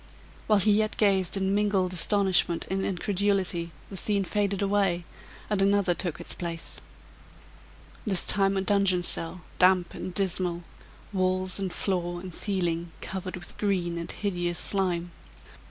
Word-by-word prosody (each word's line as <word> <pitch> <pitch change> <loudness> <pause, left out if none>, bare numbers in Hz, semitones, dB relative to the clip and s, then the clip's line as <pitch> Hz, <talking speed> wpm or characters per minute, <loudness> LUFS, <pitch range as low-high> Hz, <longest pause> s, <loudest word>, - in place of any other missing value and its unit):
While 215 - +5
he 205 +2 +6
yet 215 +1 +1
gazed 195 -3 +2
in 190 0 0
mingled 200 -3 +1
astonishment 185 -2 +3
and 190 0 0
incredulity, 190 -2 0 0.2
the - - -6
scene 200 +1 +2
faded 200 +1 -1
away, 195 -4 +1 0.4
and 205 -2 0
another 200 -2 +3
took 175 -2 -2
its - - -3
place. 170 -2 -5 1.2
This 190 -5 +3
time 195 -1 +1
a - - +1
dungeon 195 -2 +2
cell, 175 +1 +2 0.2
damp 180 -1 +4
and 185 - -6
dismal; 180 -2 -1 0.5
walls, 185 0 0
and 190 -2 -2
floor, 175 -2 -2
and 180 -1 -8
ceiling 175 -4 -2
covered 185 -1 -5
with 175 - -9
green 180 -5 -1
and 170 - -4
hideous 175 -4 -2
slime. 175 -3 +1
185 Hz, 140 wpm, -27 LUFS, 175-200 Hz, 1.2 s, he